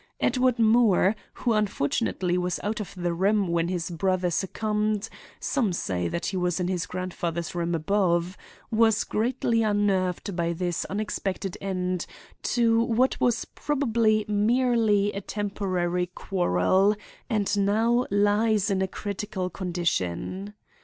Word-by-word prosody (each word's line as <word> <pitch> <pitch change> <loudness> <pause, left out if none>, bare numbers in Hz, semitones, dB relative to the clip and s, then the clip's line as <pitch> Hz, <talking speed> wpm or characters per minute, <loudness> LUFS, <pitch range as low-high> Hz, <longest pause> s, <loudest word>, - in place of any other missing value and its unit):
Edward 250 -1 +2
Moore, 220 -3 +4 0.2
who, 240 - 0
unfortunately, 195 - 0
was 180 -1 -1
out 210 +1 -2
of 210 - -5
the 175 -1 -1
room 200 +3 +2
when 170 0 +1
his 175 0 -3
brother 180 +1 0
succumbed—some 210 - -2
say 90 - -1
that 170 - -3
he 190 - -2
was 180 -1 0
in 180 - 0
his 180 -2 -2
grandfather's 175 -2 -3
room 170 -1 -1
above—was 200 +5 0
greatly 230 0 0
unnerved 200 -3 0
by 170 -1 0
this 175 0 -2
unexpected 195 -2 -3
end 185 -2 -2 0.3
to 230 -1 +2
what 240 +3 +1
was 240 -2 +2
probably 230 -7 +1
merely 215 -1 +2
a 200 - -4
temporary 185 -4 -2
quarrel, 185 - +1 0.3
and 210 -4 +1
now 230 +5 +2
lies 205 +1 +2
in 190 -1 +1
a 190 - +1
critical 195 -1 -4
condition. 180 - -2
195 Hz, 125 wpm, -26 LUFS, 180-215 Hz, 0.3 s, Moore